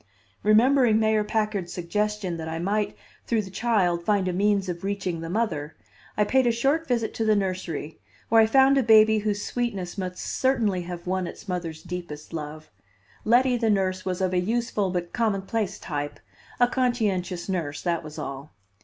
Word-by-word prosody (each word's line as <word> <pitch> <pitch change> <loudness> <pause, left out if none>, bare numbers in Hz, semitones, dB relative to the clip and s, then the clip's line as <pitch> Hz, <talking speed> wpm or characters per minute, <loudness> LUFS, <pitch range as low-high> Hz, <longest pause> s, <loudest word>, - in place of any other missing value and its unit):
Remembering 230 +1 +4
Mayor 220 -1 +2
Packard's 210 -4 -1
suggestion 200 +1 -2
that 160 0 -5
I 160 - -3
might 205 +5 -1 0.3
through 225 -2 +1
the 190 - -10
child 185 -6 +1
find 200 -1 +1
a 180 - 0
means 200 +1 +2
of 175 0 -5
reaching 195 -4 -2
the 165 - -5
mother, 165 -8 -2 0.4
I 210 - +4
paid 260 +4 +3
a - - +4
short 275 +8 +1
visit 235 -4 0
to 225 - -2
the 215 -1 +3
nursery 185 -6 -3 0.3
where 225 0 +6
I 220 - +5
found 270 +3 +5
a - - +4
baby 220 -2 +6
whose 205 -1 -2
sweetness 205 -6 -3
must 180 -1 -4
certainly 230 -8 0
have 175 0 -7
won 185 0 -1
its - - -10
mother's 170 -4 -4
deepest 170 -4 -7
love. 155 0 -7 0.5
Letty, 245 +3 +4
the 225 -1 +1
nurse, 190 -2 +1
was 185 0 -3
of 185 -1 0
a 180 - +3
useful 220 0 0
but 175 -1 -3
commonplace 215 -2 -1
type, 145 -1 -5 0.4
a 245 - +7
conscientious 210 -9 -1
nurse, 160 -7 -3
that 170 -2 0
was 155 0 -9
all. 140 +2 -6
195 Hz, 180 wpm, -25 LUFS, 175-220 Hz, 0.5 s, a